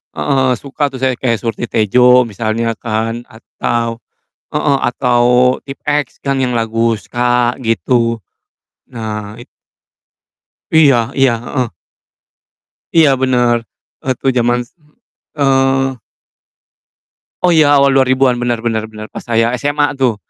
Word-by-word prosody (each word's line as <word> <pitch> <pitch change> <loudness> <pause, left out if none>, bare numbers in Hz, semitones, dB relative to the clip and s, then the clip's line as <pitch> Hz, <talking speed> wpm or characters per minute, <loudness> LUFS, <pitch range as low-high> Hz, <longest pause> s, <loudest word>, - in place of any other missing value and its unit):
heeh - - -4 0.3
heeh, - - +3
suka 145 +1 -2
tuh 130 - -8
saya, 130 -1 +2
kayak 115 -3 0
seperti 115 +1 -3
"Surti-Tejo," 125 +4 +4
misalnya 115 +1 -2
kan, 115 +1 -3
atau 115 +1 -4 0.5
heeh, 150 -2 +1
atau 120 0 +1 0.4
Tipe-X 145 +1 -3
kan, 140 -1 0
yang 125 - 0
lagu 115 0 0
SKA, 120 +3 0
gitu. 115 +2 0 0.7
Nah, 105 -2 -6
it 120 - -12 1.3
Iya 150 -4 +6 0.2
iya, 135 -2 +4
heeh. 125 - -3 1.2
Iya, 160 -3 +5
benar, 125 -2 +2 0.5
waktu 130 0 0
jaman 120 0 +2
s - - -27
m 150 -3 -30 0.5
eee 135 -1 +2 1.5
Oh 180 - +4
iya, 155 -3 +5
awal 140 0 +4
2000-an 130 -1 +2
benar 120 -1 -2
benar 110 -2 -1
benar, 110 0 -10
pas - - -8
saya 115 0 +1
SMA 145 +1 0
tuh. 125 -4 +2
120 Hz, 125 wpm, -15 LUFS, 115-135 Hz, 1.5 s, Iya